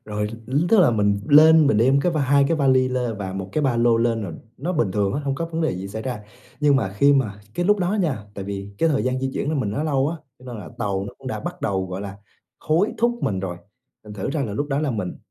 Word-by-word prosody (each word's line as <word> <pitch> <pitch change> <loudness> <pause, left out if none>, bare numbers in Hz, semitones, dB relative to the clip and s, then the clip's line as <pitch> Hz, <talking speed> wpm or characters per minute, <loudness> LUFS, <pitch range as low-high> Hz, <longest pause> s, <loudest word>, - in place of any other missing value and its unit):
Rồi 105 0 -3 0.2
ứ 145 +7 +1
tức 220 -4 +5
là 150 - +5
mình 105 -2 +1
lên 155 +1 +7
mình 110 - +3
đem 135 +4 +4
cái 175 +3 +1
va 155 - 0
hai 140 +1 +3
cái 165 - +1
vali 130 -3 +3
lên 125 -4 -2
và 95 -2 -4
1 95 0 -5
cái 155 - 0
ba 130 -4 +1
lô 120 -1 +3
lên 115 -1 +1
rồi, 90 - -5 0.2
nó 170 +7 -3
bình 120 - +1
thường 100 -2 0
á, 145 - -1
hổng 135 -1 -1
có 165 - -3
vấn 165 0 -4
đề 160 - 0
gì 95 +2 -6
xảy 110 +2 -6
ra. 125 -5 -4 0.4
Nhưng 145 -2 +4
mà 110 -7 0
khi 140 +5 +5
mà 105 -7 0
cái 175 - -1
lúc 210 +1 +3
đó 180 +2 0
nha, 135 - -1
tại 100 - -6
vì 100 0 -6
cái 165 - +3
thời 145 -3 +1
gian 130 0 0
di 135 0 -1
chuyển - - -2
của 155 - 0
mình 110 -8 -1
nó 140 - -2
lâu 140 -2 +1
á, 170 - -4 0.2
cho 125 - -18
nên 125 -2 -7
là 95 - -8
tàu 100 -3 -1
nó - - -9
cũng 135 - -13
đã - - -3
bắt 175 +1 -6
đầu, 95 -2 -1
gọi 95 +1 -5
là, 100 -1 -7 0.4
hối 165 +7 +1
thúc 240 +1 +1
mình 95 -3 -1
rồi, 90 -2 -4 0.5
thành 105 - -10
thử 100 +6 -3
ra 145 -1 -1
là 105 -5 -3
lúc 145 +7 -2
đó 140 +1 0
là 150 -3 0
mình, 105 -6 -4
130 Hz, 295 wpm, -22 LUFS, 105-150 Hz, 0.5 s, lên